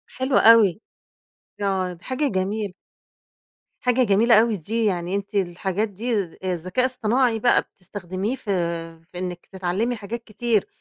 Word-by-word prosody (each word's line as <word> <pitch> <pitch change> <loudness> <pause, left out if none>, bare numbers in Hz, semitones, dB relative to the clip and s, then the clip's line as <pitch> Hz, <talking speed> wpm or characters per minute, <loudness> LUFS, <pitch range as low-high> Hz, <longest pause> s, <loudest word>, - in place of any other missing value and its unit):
حلو 260 0 +1
أوي. 225 -3 +7 0.9
ي - - -4
آه، 190 -2 0
دي 170 - -17
حاجة 260 +3 -1
جميل 205 +2 -1 1.1
حاجة 250 0 +3
جميلة 220 +2 +5
أوي 230 -1 +1
دي، 225 +7 -2
يعني 180 -1 -1
أنتِ 200 +1 -5
الحاجات 190 +3 -1
دي 230 +5 -3 0.3
آآ 185 -1 0
ذكاء 185 +9 -1
اصطناعي 245 -1 +1
بقى 240 +2 +4
بتستخدميه 190 +4 -5
في 230 -6 -5 0.6
في 180 - -7
إنِك 180 -1 -5
تتعلّمي 190 +6 -1
حاجات 230 +2 -6
كتير 220 -1 0
210 Hz, 145 wpm, -23 LUFS, 185-235 Hz, 1.1 s, أوي